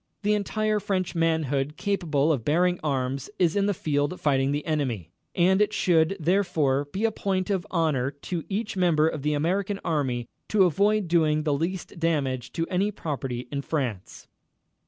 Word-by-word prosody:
The 210 Hz, +1 st, +3 dB
entire 215 Hz, +1 st, 0 dB
French 190 Hz, -3 st, -1 dB
manhood 155 Hz, -4 st, 0 dB
capable 165 Hz, -8 st, +1 dB
of 125 Hz, -6 st, -3 dB
bearing 175 Hz, +6 st, +2 dB
arms 135 Hz, -1 st, -2 dB
is 170 Hz, -1 st, +2 dB
in 200 Hz, 0 st, +2 dB
the 205 Hz, -, +2 dB
field 145 Hz, +2 st, -1 dB
fighting 135 Hz, -2 st, +2 dB
the 145 Hz, +1 st, -2 dB
enemy, 125 Hz, -, -2 dB, 0.2 s
and 190 Hz, +3 st, +4 dB
it 210 Hz, 0 st, +2 dB
should, 175 Hz, -1 st, +2 dB
therefore, 160 Hz, -6 st, +1 dB
be 190 Hz, +10 st, -2 dB
a 225 Hz, -, +2 dB
point 190 Hz, -2 st, -1 dB
of 190 Hz, -3 st, -1 dB
honor 155 Hz, -7 st, +1 dB
to 150 Hz, +4 st, -5 dB
each 210 Hz, +2 st, -2 dB
member 170 Hz, -4 st, +3 dB
of 155 Hz, -3 st, -3 dB
the 150 Hz, +2 st, 0 dB
American 195 Hz, +6 st, 0 dB
Army 130 Hz, -7 st, -1 dB, 0.2 s
to 210 Hz, -2 st, +4 dB
avoid 200 Hz, +3 st, +2 dB
doing 155 Hz, -2 st, +2 dB
the 150 Hz, -2 st, +1 dB
least 170 Hz, +4 st, -3 dB
damage 140 Hz, -7 st, -1 dB
to 165 Hz, -, -1 dB
any 190 Hz, +4 st, 0 dB
property 135 Hz, -, -4 dB
in 140 Hz, -1 st, -2 dB
France." 125 Hz, -, -4 dB
165 Hz, 170 wpm, -26 LUFS, 145-190 Hz, 0.2 s, and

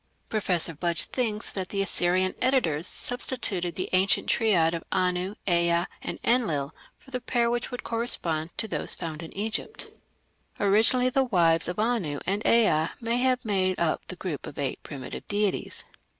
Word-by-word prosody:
Professor 180 Hz, -6 st, +2 dB
Budge 170 Hz, +1 st, +2 dB
thinks 220 Hz, -5 st, -2 dB
that 185 Hz, -2 st, -5 dB
the 195 Hz, -1 st, -1 dB
Assyrian 185 Hz, 0 st, +1 dB
editors 185 Hz, -, +1 dB
substituted 200 Hz, -9 st, 0 dB
the 185 Hz, -, -3 dB
ancient 185 Hz, +1 st, +3 dB
triad 180 Hz, -8 st, +3 dB
of 165 Hz, -, -4 dB
Anu, 180 Hz, +2 st, 0 dB
Ea, 170 Hz, -1 st, +2 dB, 0.2 s
and -, -, -4 dB
Enlil 165 Hz, -, +1 dB, 0.2 s
for 265 Hz, -, -19 dB
the 250 Hz, -1 st, -3 dB
pair 235 Hz, -1 st, +1 dB
which 240 Hz, 0 st, -2 dB
would 245 Hz, -, -6 dB
correspond 170 Hz, -9 st, 0 dB
to 220 Hz, -, +1 dB
those -, -, +2 dB
found 160 Hz, -1 st, -6 dB
in 165 Hz, -, -9 dB
Egypt. 220 Hz, -, -3 dB, 0.7 s
Originally 225 Hz, +5 st, +3 dB
the 270 Hz, +1 st, +2 dB
wives 170 Hz, -7 st, +3 dB
of 180 Hz, -, -4 dB
Anu 210 Hz, -10 st, 0 dB
and 200 Hz, +3 st, -1 dB
Ea 190 Hz, -9 st, +3 dB
may 230 Hz, 0 st, -1 dB
have 255 Hz, 0 st, +1 dB
made 185 Hz, -3 st, +1 dB
up 165 Hz, -2 st, 0 dB
the 185 Hz, -, -7 dB
group 175 Hz, -6 st, -5 dB
of -, -, -10 dB
eight 140 Hz, -2 st, -3 dB
primitive 140 Hz, -4 st, -8 dB
deities. 205 Hz, -1 st, -1 dB
190 Hz, 165 wpm, -26 LUFS, 170-230 Hz, 0.7 s, ancient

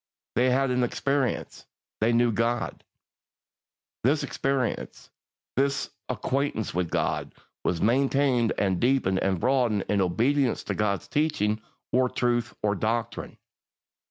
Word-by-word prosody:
1. 120 Hz, -, +2 dB
They -, -, +4 dB
had 135 Hz, +1 st, +2 dB
an 125 Hz, 0 st, +1 dB
experience. 135 Hz, +2 st, -1 dB, 0.3 s
They 110 Hz, +2 st, +3 dB
knew 120 Hz, 0 st, +3 dB
God. 115 Hz, +1 st, -1 dB, 1.2 s
2. 125 Hz, -, +5 dB
This 150 Hz, +1 st, +1 dB
experience, 135 Hz, -2 st, -2 dB, 0.4 s
this 140 Hz, +1 st, 0 dB, 0.2 s
acquaintance 135 Hz, -5 st, -1 dB
with 90 Hz, -1 st, -1 dB
God, -, -, -1 dB, 0.3 s
was 85 Hz, -2 st, 0 dB
maintained 130 Hz, 0 st, +3 dB
and 95 Hz, -3 st, +1 dB
deepened 120 Hz, -7 st, +2 dB
and 95 Hz, -2 st, 0 dB
broadened 120 Hz, -5 st, +2 dB
in 100 Hz, -1 st, +2 dB
obedience 120 Hz, +9 st, +1 dB
to -, -, -2 dB
God's 105 Hz, -2 st, -1 dB
teaching, 110 Hz, -9 st, 0 dB, 0.3 s
or 125 Hz, 0 st, +3 dB
truth, 120 Hz, -1 st, 0 dB
or 105 Hz, -1 st, +2 dB
doctrine. 110 Hz, +3 st, -2 dB
120 Hz, 130 wpm, -27 LUFS, 105-135 Hz, 1.2 s, 2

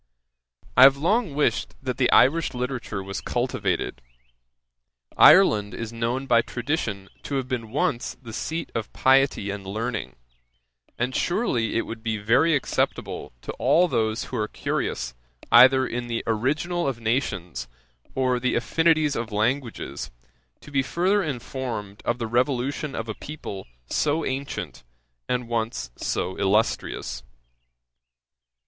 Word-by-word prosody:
'I -, -, +8 dB
have 135 Hz, 0 st, +7 dB
long 180 Hz, -, +1 dB
wished 150 Hz, -, 0 dB
that 130 Hz, -2 st, -4 dB
the 130 Hz, -2 st, +2 dB
Irish 160 Hz, +2 st, +4 dB
literature 125 Hz, -5 st, -3 dB
were 95 Hz, +1 st, -7 dB
cultivated. -, -, -1 dB, 1.1 s
Ireland 105 Hz, -, +6 dB
is 115 Hz, 0 st, -5 dB
known 120 Hz, +3 st, -2 dB
by 120 Hz, -3 st, +4 dB
tradition 115 Hz, -6 st, -3 dB
to 140 Hz, -, -4 dB
have 130 Hz, -2 st, -1 dB
been 120 Hz, -4 st, -3 dB
once 125 Hz, -1 st, -1 dB
the 115 Hz, -3 st, -10 dB
seat 160 Hz, +8 st, -4 dB
of 115 Hz, -, -3 dB
piety 130 Hz, -6 st, +3 dB
and 100 Hz, -1 st, -6 dB
learning; 110 Hz, -, -4 dB, 0.8 s
and 125 Hz, +2 st, -1 dB
surely 130 Hz, -, 0 dB
it 115 Hz, -, +1 dB
would 115 Hz, 0 st, -7 dB
be 110 Hz, -1 st, -1 dB
very 125 Hz, +10 st, +3 dB
acceptable 140 Hz, -, -2 dB
to -, -, -4 dB
all 180 Hz, +2 st, +4 dB
those 110 Hz, -5 st, 0 dB
who 125 Hz, -, -5 dB
are 105 Hz, -1 st, 0 dB
curious 65 Hz, -, -3 dB, 0.4 s
either 130 Hz, +3 st, +7 dB
in 120 Hz, -1 st, -4 dB
the 115 Hz, -1 st, -2 dB
original 150 Hz, +10 st, 0 dB
of 130 Hz, -4 st, -2 dB
nations, 100 Hz, -, -2 dB, 0.5 s
or 130 Hz, -1 st, +1 dB
the 130 Hz, +1 st, 0 dB
affinities 155 Hz, +3 st, +2 dB
of 115 Hz, -1 st, -3 dB
languages, 115 Hz, +4 st, -2 dB, 0.5 s
to 150 Hz, -, -13 dB
be 135 Hz, -1 st, +2 dB
further 185 Hz, +9 st, +1 dB
informed 120 Hz, -, -5 dB
of 120 Hz, -, 0 dB
the 120 Hz, -, -3 dB
revolution 130 Hz, +5 st, 0 dB
of 115 Hz, -, -4 dB
a 110 Hz, -, -3 dB
people 105 Hz, -, -8 dB, 0.2 s
so 150 Hz, -, 0 dB
ancient, 135 Hz, -, -4 dB, 0.5 s
and 125 Hz, -1 st, -1 dB
once 115 Hz, -, -2 dB
so 95 Hz, -, -2 dB
illustrious. 100 Hz, +3 st, 0 dB
125 Hz, 135 wpm, -25 LUFS, 110-140 Hz, 1.1 s, I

